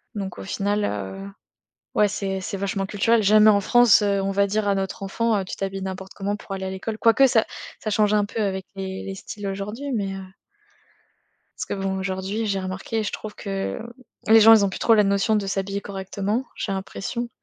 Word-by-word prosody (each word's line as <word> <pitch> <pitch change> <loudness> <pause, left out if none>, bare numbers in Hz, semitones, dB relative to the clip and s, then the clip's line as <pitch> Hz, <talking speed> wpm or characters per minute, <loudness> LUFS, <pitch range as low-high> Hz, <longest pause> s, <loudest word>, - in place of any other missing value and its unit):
Donc 195 -2 -5
au - - -7
final, 205 +2 -1
heu, 95 - -4 0.7
ouais 210 - +4
c'est 195 -1 -3
c'est 195 - -4
vachement 195 0 -2
culturel. 220 +3 +2
Jamais 215 +1 +6
en 200 -1 +4
France, 240 +1 +5
heu, 200 -1 +1
on 195 - -1
va 200 +1 +2
dire 205 +1 0
à 200 - +3
notre 195 +1 -3
enfant 220 +3 0
heu: 195 - -2
«Tu 185 - -7
t'habilles 195 0 -4
n'importe 190 0 -6
comment 205 +1 -2
pour 200 - -10
aller 190 0 -4
à - - -3
l'école», 200 +3 -4
quoique 230 +5 +5
ça 230 -3 +3 0.4
ça 215 - -2
change 210 0 +3
un 205 -1 +3
peu 220 +2 -4
avec 190 -2 -1
les 190 0 -5
les 195 - -5
styles 200 +1 -7
aujourd'hui 210 +8 -4
mais, 195 -3 -2
heu. 190 0 -7 1.4
Parce - - -2
que - - -4
bon 190 0 -1
aujourd'hui 190 +3 -2
j'ai 195 -2 -1
remarqué 190 +4 -3
je 205 - -3
trouve 215 -1 -7
que, 195 -1 -4 0.5
les 225 0 +9
gens 225 +1 +9
ils 215 -2 +6
ont 200 - +2
plus - - -7
trop 230 - +4
la 210 - +5
notion 200 +2 +2
de 205 -2 0
s'habiller 195 +1 -2
correctement, 200 +4 -3
j'ai 200 - -3
l'impression 195 +5 -4
200 Hz, 215 wpm, -23 LUFS, 195-215 Hz, 1.4 s, les